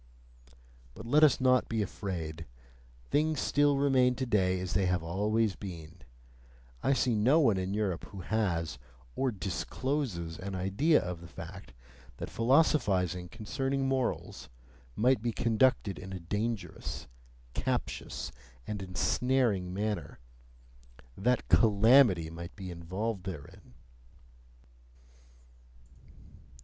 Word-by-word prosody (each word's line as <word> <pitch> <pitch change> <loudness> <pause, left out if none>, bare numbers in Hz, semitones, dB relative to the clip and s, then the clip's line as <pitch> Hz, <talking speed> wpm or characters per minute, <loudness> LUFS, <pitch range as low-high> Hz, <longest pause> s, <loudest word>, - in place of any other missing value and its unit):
But - - -9
let 145 +6 +4
us 145 -4 +6
not 130 -1 +3
be 110 -2 0
afraid! 85 -6 -5 0.6
Things 155 0 +2
still 145 0 +3
remain 130 -3 +3
today 100 -8 +1
as 90 -1 -4
they 95 0 +2
have 90 -2 0
always 105 +5 0
been: 85 -4 -9 0.8
I 135 - +2
see 130 -2 +1
no 120 +9 +4
one 115 -10 +4
in 95 +2 -2
Europe 100 -5 -1
who 100 -2 -9
has 85 - -1 0.4
(or 135 - +1
DISCLOSES) 95 - -3
an 95 0 -5
idea 100 - +3
of 90 -1 -5
the 85 - -10
fact - - -10 0.4
that - - -6
philosophizing 100 - +2
concerning 135 +5 -2
morals 130 -2 -2 0.5
might 125 0 +3
be 120 0 -1
conducted 115 -3 +1
in 95 0 -8
a 95 - -5
dangerous, 105 +5 -4 0.5
captious, - - -3 0.3
and 105 +4 -4
ensnaring 100 0 +1
manner 105 +2 -3 1.0
that 125 +6 0
CALAMITY 110 -5 +5
might 85 +1 -8
be 95 -2 -7
involved 95 +4 -4
therein. 75 -8 -9
105 Hz, 115 wpm, -30 LUFS, 90-125 Hz, 1.0 s, us